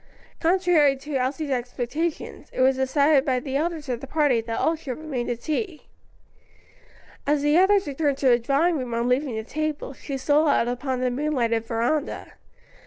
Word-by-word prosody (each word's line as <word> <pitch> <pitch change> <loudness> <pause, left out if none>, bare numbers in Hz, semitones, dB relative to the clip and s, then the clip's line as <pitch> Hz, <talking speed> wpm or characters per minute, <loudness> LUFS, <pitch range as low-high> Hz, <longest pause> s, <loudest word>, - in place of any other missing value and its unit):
Contrary 335 -5 +3
to 285 +3 -9
Elsie's 270 +3 -1
expectations, 250 +6 -3
it - - -2
was 260 0 +4
decided 280 +2 +3
by 260 -3 +1
the 265 +1 -5
elders 315 0 -2
of 245 -2 -3
the 275 - -7
party 285 -5 +2
that 225 0 -4
all 325 - +2
should 285 -6 -6
remain 285 -6 -4
to 240 - -2
tea. 310 - -4 1.4
As 290 0 +2
the 295 +1 +3
others 390 +1 +4
returned 285 -1 -1
to 270 -2 +2
the 240 -1 +5
drawing 290 +7 +1
room 245 -2 -4
on 235 +1 0
leaving 255 0 0
the 220 - -3
table, 305 +2 -3
she 275 +1 -6
stole 295 +4 +2
out 240 - +3
upon 255 +1 -2
the 250 -1 +1
moonlighted 245 -5 0
veranda. 245 +6 -2
275 Hz, 175 wpm, -24 LUFS, 250-305 Hz, 1.4 s, the